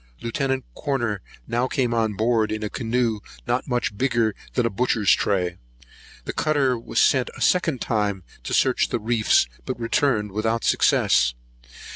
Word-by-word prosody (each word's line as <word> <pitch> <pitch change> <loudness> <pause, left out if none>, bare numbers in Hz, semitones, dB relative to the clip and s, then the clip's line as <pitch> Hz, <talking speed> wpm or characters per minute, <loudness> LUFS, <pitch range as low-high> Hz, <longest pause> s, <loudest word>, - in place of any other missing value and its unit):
Lieut. 130 +2 -2
Corner 120 -8 -2 0.3
now 120 +2 0
came 125 -3 0
on 110 -2 0
board, 110 +1 +1
in 110 0 -3
a 105 - -3
canoe 115 -2 0 0.3
not 120 +1 -1
much 120 -5 -1
bigger 115 -2 +1 0.2
than 125 - +1
a 115 - 0
butcher's 110 -2 +2
tray. 90 -3 +1 0.7
The - - -4
cutter 145 -5 +1
was 115 - -2
sent 130 -2 +3
a - - -10
second 165 -8 +2
time 105 -4 -1 0.2
to - - -4
search - - +2
the 120 - -1
reefs, 110 0 +3 0.2
but 110 - -5
returned 115 -3 +1
without 110 +3 -1
success. - - +3
115 Hz, 155 wpm, -23 LUFS, 105-125 Hz, 0.7 s, sent